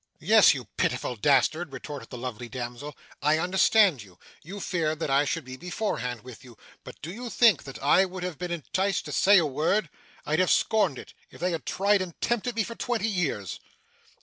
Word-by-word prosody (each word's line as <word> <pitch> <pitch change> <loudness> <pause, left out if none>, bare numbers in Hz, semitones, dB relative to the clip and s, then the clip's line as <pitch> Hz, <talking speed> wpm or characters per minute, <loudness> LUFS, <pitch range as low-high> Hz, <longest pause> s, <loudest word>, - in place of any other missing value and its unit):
'Yes, - - +5
you - - -6
pitiful 125 - -1
dastard,' 150 +6 +2
retorted 145 +1 -8
the 125 - -8
lovely 120 -1 -6
damsel, 125 +4 -7 0.2
'I 150 +2 +3
understand 185 - +3
you. 95 -4 -16 0.2
You 195 +6 -8
feared 160 -5 -1
that 155 - -2
I 140 +2 +3
should 140 - -2
be 130 0 -8
beforehand 125 - -3
with 125 +1 -12
you. 120 -4 -15 0.3
But - - -11
do 165 - -5
you 240 +3 -7
think 225 - +4
that 135 - -8
I 170 +7 +5
would 185 -1 -7
have 180 -4 -5
been 180 0 -4
enticed 175 +3 -1
to 150 - -6
say 200 +6 +5
a 170 - +4
word! 155 +5 0 0.3
I'd 155 +2 0
have 185 - +3
scorned 200 - +2
it, - - -11 0.2
if - - -15
they 180 +2 0
had 160 -6 -5
tried 200 +1 +2
and 180 -3 -7
tempted 240 0 -1
me 225 - +1
for 230 - -6
twenty 230 -2 -2
years. 160 - -2
165 Hz, 200 wpm, -27 LUFS, 135-195 Hz, 0.3 s, Yes